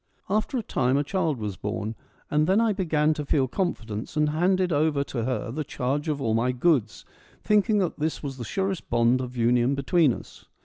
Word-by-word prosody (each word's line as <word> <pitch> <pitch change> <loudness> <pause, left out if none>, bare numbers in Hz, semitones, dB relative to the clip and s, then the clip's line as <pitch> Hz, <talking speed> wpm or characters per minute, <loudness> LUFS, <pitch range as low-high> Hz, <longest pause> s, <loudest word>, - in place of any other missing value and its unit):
After 215 +5 0
a 235 - -2
time 130 -7 +1
a 145 - +2
child 160 -2 -1
was 105 -4 -4
born 105 +1 -3 0.4
and 150 +1 +2
then 190 +3 +4
I 225 -2 +3
began 155 -5 +1
to 150 - -4
feel 140 -2 +1
confidence, 120 - -3
and 150 0 +3
handed 180 +3 +1
over 145 -1 +2
to 120 -4 -4
her 115 -3 -2
the 155 +5 -3
charge 145 +1 -2
of 145 -2 -1
all 115 -5 0
my 115 +3 +2
goods, 125 -1 +1 0.4
thinking 210 +1 +3
that 185 -6 -1
this 155 +1 -2
was 135 -2 -5
the 120 - -5
surest 190 - -3
bond 120 +2 +3
of 125 0 -6
union 120 +3 +3
between 145 +2 +3
us. - - -9
145 Hz, 205 wpm, -26 LUFS, 125-175 Hz, 0.4 s, then